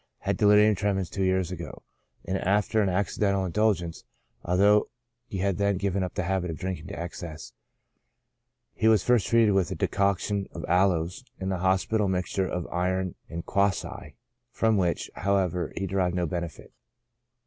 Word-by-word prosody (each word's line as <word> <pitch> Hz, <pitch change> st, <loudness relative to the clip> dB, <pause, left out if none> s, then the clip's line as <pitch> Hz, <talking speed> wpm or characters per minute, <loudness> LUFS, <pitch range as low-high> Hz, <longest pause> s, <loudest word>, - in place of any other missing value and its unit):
Had -, -, 0 dB
delirium 105 Hz, +1 st, +5 dB
tremens 95 Hz, -3 st, -1 dB
two 100 Hz, -, -3 dB
years 95 Hz, -2 st, +1 dB
ago, 85 Hz, -1 st, -7 dB, 0.4 s
after 100 Hz, +3 st, +1 dB
an 100 Hz, -, +2 dB
accidental 100 Hz, +1 st, 0 dB
indulgence, 90 Hz, -3 st, 0 dB, 0.4 s
although 100 Hz, +4 st, +3 dB, 0.4 s
he 100 Hz, -, -5 dB
had 95 Hz, 0 st, 0 dB
then 100 Hz, -1 st, +2 dB
given 100 Hz, 0 st, -1 dB
up 90 Hz, -, -3 dB
the 105 Hz, -, -1 dB
habit 90 Hz, 0 st, -1 dB
of 80 Hz, -, -4 dB
drinking 95 Hz, -1 st, -4 dB
to -, -, -7 dB
excess. 85 Hz, -2 st, -7 dB, 1.2 s
He 110 Hz, -, +1 dB
was 110 Hz, -4 st, +5 dB
first 120 Hz, -4 st, +3 dB
treated 115 Hz, -2 st, +4 dB
with 95 Hz, -3 st, +2 dB
a -, -, -3 dB
decoction 100 Hz, 0 st, 0 dB
of -, -, -6 dB
aloes, 90 Hz, +2 st, +1 dB, 0.2 s
and 95 Hz, 0 st, -2 dB
the 95 Hz, -, -2 dB
hospital 95 Hz, +3 st, +1 dB
mixture 95 Hz, 0 st, -1 dB
of 90 Hz, -1 st, -3 dB
iron 95 Hz, +1 st, -1 dB, 0.2 s
and 85 Hz, 0 st, -6 dB
quassia, 100 Hz, -1 st, -1 dB, 0.4 s
from 110 Hz, -2 st, +1 dB
which, 90 Hz, -4 st, 0 dB
however, 95 Hz, -3 st, 0 dB
he 100 Hz, -, -1 dB
de 95 Hz, +1 st, -4 dB
rived 90 Hz, -2 st, +1 dB
no 90 Hz, -1 st, 0 dB
benefit. 85 Hz, 0 st, -5 dB
95 Hz, 160 wpm, -27 LUFS, 90-100 Hz, 1.2 s, delirium